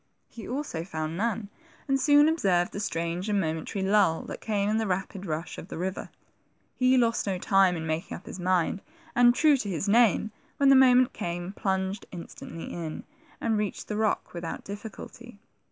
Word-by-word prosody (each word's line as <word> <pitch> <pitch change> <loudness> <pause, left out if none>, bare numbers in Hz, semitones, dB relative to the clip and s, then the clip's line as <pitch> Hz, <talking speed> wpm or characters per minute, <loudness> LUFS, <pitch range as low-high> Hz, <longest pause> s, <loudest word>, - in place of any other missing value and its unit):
He 230 - -10
also 250 - -3
found 160 -2 -4
none, 220 +1 -1 0.4
and 270 -1 +1
soon 290 +2 +6
observed 190 - +2
the - - -5
strange 175 0 -2
and 205 -1 +2
momentary 165 +3 -2
lull 195 -5 +3
that - - -8
came 205 -2 0
in 215 +1 +1
the 225 -1 0
rapid 190 +1 -3
rush 160 +1 -4
of - - -9
the - - -7
river. 185 +2 -4 0.6
He 255 0 +3
lost 230 -3 +2
no 190 -2 0
time 190 0 +3
in 160 - -5
making 160 +3 -3
up - - -16
his - - -8
mind, 185 +1 +1 0.3
and, 240 0 +6
true 300 0 +5
to 210 -6 -4
his 190 +2 -2
name, 220 -1 +4 0.3
when 280 -1 +4
the 275 - +8
moment 255 -1 +6
came, 175 +2 -4
plunged 190 0 -2
instantly 170 -1 -8
in, 165 -3 -5 0.4
and 225 -2 0
reached 210 -2 -3
the 210 - -2
rock 215 0 0
without 170 -1 -5
difficulty. 215 +3 -9
200 Hz, 185 wpm, -27 LUFS, 175-230 Hz, 0.6 s, the